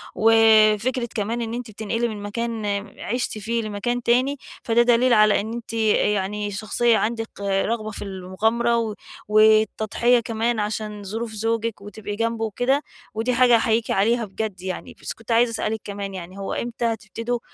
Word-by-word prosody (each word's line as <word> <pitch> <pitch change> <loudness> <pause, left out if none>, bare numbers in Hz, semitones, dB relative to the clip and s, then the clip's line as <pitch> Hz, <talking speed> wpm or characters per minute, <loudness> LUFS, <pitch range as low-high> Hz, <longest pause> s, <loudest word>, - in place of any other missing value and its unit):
وفكرة 225 +2 +4
كمان 225 +3 -1
إن 225 0 -3
أنتِ 240 -2 -5
بتنقلي 225 +3 -2
من 210 -2 -6
مكان 225 +1 -3 0.3
عشتِ 240 -1 -2
فيه 230 +3 -2
لمكان 230 +3 -2
تاني 255 +4 +2 0.3
فده 235 +1 +3
دليل 240 +1 +4
على 215 -1 +5
إن 220 +2 -5
أنتِ 235 -1 -7
يعني 210 -2 +1
شخصيّة 220 +3 +1
عندِك 225 0 -2
رغبة 215 +3 -1
في - - -8
المغامرة 220 +4 0 0.3
والتضحية 220 +2 +4
كمان 230 0 -1
عشان 210 0 -3
ظروف 220 +3 -4
زوجِك 225 0 -2
وتبقي 205 0 -7
جنبه 230 0 -1
وكده، 250 +6 +1 0.3
ودي 225 +3 0
حاجة 245 -1 +5
أحييكِ 225 0 +1
عليها 230 +4 +2
بجد 200 -2 -5
يعني. 185 -1 -6
بس - - -4
كنت 225 +1 -9
عايزة 235 +1 +4
أسألِك 220 -1 -2
كمان 200 -1 -5
يعني 185 +1 -8
هو 195 0 -4
إمتى 235 0 -3
هتبتدوا 230 +1 -2
225 Hz, 155 wpm, -23 LUFS, 210-235 Hz, 0.3 s, على